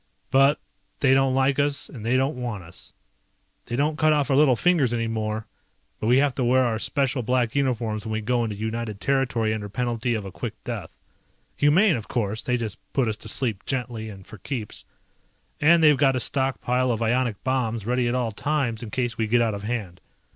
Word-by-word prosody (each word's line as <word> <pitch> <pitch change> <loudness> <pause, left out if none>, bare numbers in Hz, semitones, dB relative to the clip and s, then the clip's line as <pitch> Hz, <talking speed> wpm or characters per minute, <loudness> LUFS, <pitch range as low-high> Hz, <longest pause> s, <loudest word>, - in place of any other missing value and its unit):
But 135 +2 +4 0.4
they 135 -2 +5
don't 135 -1 +3
like 135 +1 +2
us 145 0 +1
and 115 -7 -10
they 120 +3 +2
don't 135 +3 +1
want 120 -6 -4
us. 80 0 -8 0.8
They 120 - -3
don't 150 +3 0
cut 155 -1 +4
off 145 -1 +1
our - - +4
little 140 -3 +5
fingers 140 -5 +2
anymore, 110 -2 -2 0.5
but 110 - -2
we 125 +2 +5
have 140 -1 +3
to 130 - +1
wear 130 +2 +4
our 115 -3 0
special 135 +1 0
black 120 -1 0
uniforms 115 -6 0
when 110 -1 -4
we 110 - -1
go 120 +2 +1
into 110 -2 -3
United 110 0 -4
territory 125 -5 +1
under 105 -2 -5
penalty 120 +1 -1
of 105 -3 -4
a 95 - -7
quick - - -5
death. - - -6 0.6
Humane, 165 +6 +4
of 110 - -8
course, 110 -3 -2
they 125 -1 0
just 110 -4 -5
put 135 -4 +2
us 110 -1 -1
to - - -4
sleep 110 -7 0
gently 120 -4 -3
and 95 -3 -11
for 110 - -12
keeps. 115 -2 -4 0.7
And 165 +2 +5
they've 150 -1 +7
got 135 -1 +3
a - - 0
stockpile 130 0 0
of 115 -1 0
ionic 120 -2 0
bombs 115 -5 -1
ready 125 +1 +1
at 120 - 0
all 120 -3 0
times 130 -1 -1
in 115 - -6
case 120 0 -2
we 110 - +1
get 120 +2 +3
out 110 -2 0
of 100 - -5
hand. 105 -5 -4
120 Hz, 210 wpm, -24 LUFS, 110-135 Hz, 0.8 s, they've